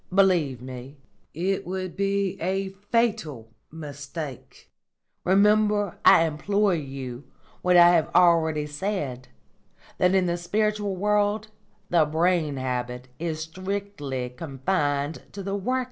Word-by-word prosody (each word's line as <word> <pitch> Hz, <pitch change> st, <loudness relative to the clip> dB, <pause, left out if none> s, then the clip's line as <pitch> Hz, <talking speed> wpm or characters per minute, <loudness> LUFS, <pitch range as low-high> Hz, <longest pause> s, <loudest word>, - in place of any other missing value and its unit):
Believe 175 Hz, -10 st, +2 dB
me, 130 Hz, +2 st, -9 dB, 0.3 s
it 190 Hz, +5 st, -1 dB
would 185 Hz, -1 st, -4 dB
be 200 Hz, -1 st, 0 dB
a 190 Hz, +2 st, -1 dB
fatal 200 Hz, -, -1 dB, 0.2 s
mistake. 145 Hz, -2 st, -8 dB, 0.6 s
Remember, 205 Hz, 0 st, +3 dB
I -, -, +7 dB
implore 200 Hz, +6 st, +1 dB
you, 135 Hz, -4 st, -5 dB, 0.4 s
what 180 Hz, 0 st, +4 dB
I 175 Hz, 0 st, +8 dB
have 165 Hz, -3 st, +2 dB
already 165 Hz, -4 st, +4 dB
said: 145 Hz, -5 st, -4 dB, 0.7 s
that, 180 Hz, +1 st, +4 dB
in 190 Hz, -1 st, +3 dB
the 175 Hz, 0 st, 0 dB
spiritual 205 Hz, +2 st, -1 dB
world, 210 Hz, +2 st, +1 dB, 0.4 s
the 170 Hz, -3 st, +5 dB
brain 160 Hz, -1 st, +1 dB
habit 125 Hz, -1 st, -3 dB
is 160 Hz, -1 st, -3 dB
strictly 175 Hz, -7 st, -4 dB
confined 145 Hz, +1 st, -2 dB
to 200 Hz, -, -6 dB
the 195 Hz, +1 st, -3 dB
working 200 Hz, +3 st, -3 dB
class." -, -, +2 dB
175 Hz, 120 wpm, -25 LUFS, 145-195 Hz, 0.7 s, I